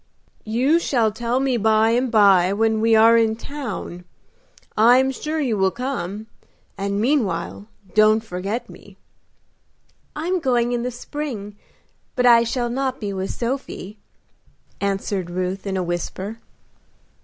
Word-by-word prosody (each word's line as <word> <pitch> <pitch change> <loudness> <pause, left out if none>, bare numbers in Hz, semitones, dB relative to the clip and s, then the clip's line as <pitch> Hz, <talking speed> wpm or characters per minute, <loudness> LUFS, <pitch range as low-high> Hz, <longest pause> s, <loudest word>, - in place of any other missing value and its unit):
"You 260 +9 +2
shall 235 -9 +1
tell 235 +3 -1
me 265 -2 +1
by 220 0 +3
and 245 +2 +1
by 195 -4 +5
when 220 +1 +1
we 225 0 +4
are 225 +1 +6
in 220 -1 +2
town. 235 -9 -6 0.7
I 235 +3 +6
am 265 +1 +2
sure 305 +4 -4
you 240 -8 0
will 190 0 +3
come, 220 -4 -4 0.5
and 200 0 -2
meanwhile 210 - -1 0.3
don't 215 +1 +4
forget 210 +4 -4
me." 200 -4 -15 1.2
"I 305 - -4
am 365 +1 0
going 245 -5 +1
in 240 -1 -1
the 250 - -2
spring, 245 -5 -6 0.6
but 250 - +1
I 235 -1 +7
shall 240 0 -2
not 265 +1 -2
be 205 -2 -4
with 190 0 -3
Sophie," 235 -5 -5 0.8
answered 195 -2 -2
Ruth, 185 +2 -3
in 190 -1 -2
a 185 - -1
whisper. 185 +5 -4
225 Hz, 145 wpm, -22 LUFS, 200-250 Hz, 1.2 s, I